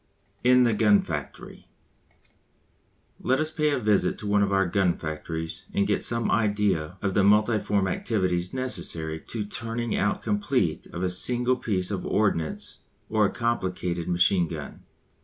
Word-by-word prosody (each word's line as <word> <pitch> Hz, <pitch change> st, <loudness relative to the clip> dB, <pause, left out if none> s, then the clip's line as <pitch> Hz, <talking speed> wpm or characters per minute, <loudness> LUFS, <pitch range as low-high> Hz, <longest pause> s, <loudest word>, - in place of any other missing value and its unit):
IN 125 Hz, 0 st, +6 dB
THE 120 Hz, -2 st, +3 dB
GUN 105 Hz, -1 st, +4 dB
FACTORY. 75 Hz, -4 st, -7 dB, 1.5 s
Let 130 Hz, +1 st, +1 dB
us 155 Hz, 0 st, -1 dB
pay 150 Hz, -1 st, +1 dB
a 145 Hz, -, +1 dB
visit 105 Hz, -4 st, +1 dB
to 105 Hz, -, -6 dB
one 100 Hz, 0 st, +3 dB
of 100 Hz, -1 st, +1 dB
our 95 Hz, 0 st, +3 dB
gun 90 Hz, -1 st, +1 dB
factories 80 Hz, +1 st, -5 dB
and 100 Hz, -, +2 dB
get 105 Hz, 0 st, 0 dB
some 115 Hz, 0 st, +1 dB
idea 100 Hz, -5 st, 0 dB
of 95 Hz, -2 st, 0 dB
the 100 Hz, -, +3 dB
multiform 105 Hz, -1 st, +3 dB
activities 90 Hz, -3 st, -1 dB
necessary 85 Hz, -11 st, -2 dB
to 110 Hz, -3 st, -3 dB
the 105 Hz, -, -11 dB
turning 115 Hz, 0 st, -3 dB
out 105 Hz, -, 0 dB
complete 140 Hz, -, 0 dB
of 85 Hz, -, -6 dB
a 90 Hz, -, 0 dB
single 125 Hz, +7 st, +2 dB
piece 95 Hz, -6 st, -2 dB
of 95 Hz, -3 st, -3 dB
ordnance 90 Hz, -7 st, -1 dB, 0.3 s
or 110 Hz, -2 st, +3 dB
a -, -, -5 dB
complicated 90 Hz, -7 st, -2 dB
machine 90 Hz, 0 st, +3 dB
gun. -, -, -8 dB
100 Hz, 160 wpm, -26 LUFS, 90-115 Hz, 1.5 s, IN